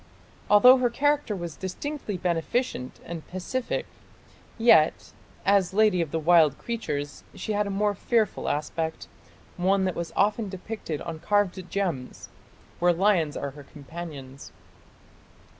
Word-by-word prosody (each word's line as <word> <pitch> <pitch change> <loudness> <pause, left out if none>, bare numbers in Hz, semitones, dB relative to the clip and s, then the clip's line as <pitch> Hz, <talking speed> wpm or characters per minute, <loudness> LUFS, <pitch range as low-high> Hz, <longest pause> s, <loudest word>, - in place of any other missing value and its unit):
Although 250 +6 +8
her 250 -1 +2
character 290 -2 +1
was 170 -4 -6
distinctly 210 +3 -5
beneficent 175 - -2
and 165 -2 -7
pacific, 210 +8 -3 0.7
yet 225 -10 +4 0.3
as 195 -2 +3
Lady 210 -4 +4
of 165 - -2
the 165 - -2
Wild 160 -3 +4
Creatures 145 -12 -4
she - - -4
had 205 0 0
a - - -3
more 205 +1 +1
fearful 220 +1 0
aspect, 160 +2 -3 0.5
one 190 +2 +2
that 185 - 0
was 170 -1 -4
often 210 +1 +1
depicted 190 -4 -5
on 160 -1 -6
carved 185 0 0
gems, 170 -11 -3 0.5
where 175 0 +4
lions 175 -4 +2
are 140 - -4
her 145 +2 -12
companions." 140 -2 -9
185 Hz, 130 wpm, -26 LUFS, 160-210 Hz, 0.7 s, Although